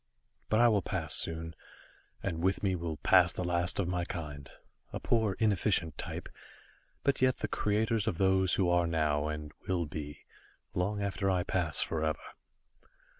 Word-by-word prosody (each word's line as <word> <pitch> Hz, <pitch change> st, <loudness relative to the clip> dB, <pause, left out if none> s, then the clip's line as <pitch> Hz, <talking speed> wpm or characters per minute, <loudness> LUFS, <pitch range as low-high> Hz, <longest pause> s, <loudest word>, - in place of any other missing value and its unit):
But 110 Hz, -, +3 dB
I 120 Hz, -, +7 dB
will 105 Hz, -4 st, +3 dB
pass -, -, -2 dB
soon, 80 Hz, 0 st, +2 dB, 0.7 s
and 85 Hz, -4 st, -2 dB
with 95 Hz, +2 st, +1 dB
me 95 Hz, -2 st, +1 dB
will 85 Hz, -3 st, -4 dB
pass 90 Hz, +1 st, +5 dB
the 90 Hz, -, -3 dB
last 90 Hz, 0 st, 0 dB
of 100 Hz, -, 0 dB
my 90 Hz, -1 st, -1 dB
kind, 75 Hz, -5 st, -6 dB, 0.4 s
a -, -, -4 dB
poor 110 Hz, -5 st, +1 dB
inefficient 95 Hz, -7 st, +2 dB
type, -, -, -5 dB, 0.8 s
but 140 Hz, -2 st, +1 dB
yet 130 Hz, 0 st, +3 dB
the -, -, -3 dB
creators 110 Hz, +1 st, 0 dB
of 100 Hz, -7 st, 0 dB
those 95 Hz, -1 st, +3 dB
who 95 Hz, -, +2 dB
are 85 Hz, -1 st, +3 dB
now, 75 Hz, -2 st, +1 dB
and 75 Hz, -1 st, -5 dB, 0.2 s
will 90 Hz, -2 st, 0 dB
be, 75 Hz, -1 st, -7 dB, 0.5 s
long 100 Hz, +3 st, -1 dB
after 100 Hz, 0 st, -1 dB
I 90 Hz, -2 st, +1 dB
pass 85 Hz, -4 st, 0 dB
forever. 80 Hz, -3 st, -2 dB
90 Hz, 165 wpm, -31 LUFS, 80-100 Hz, 0.8 s, I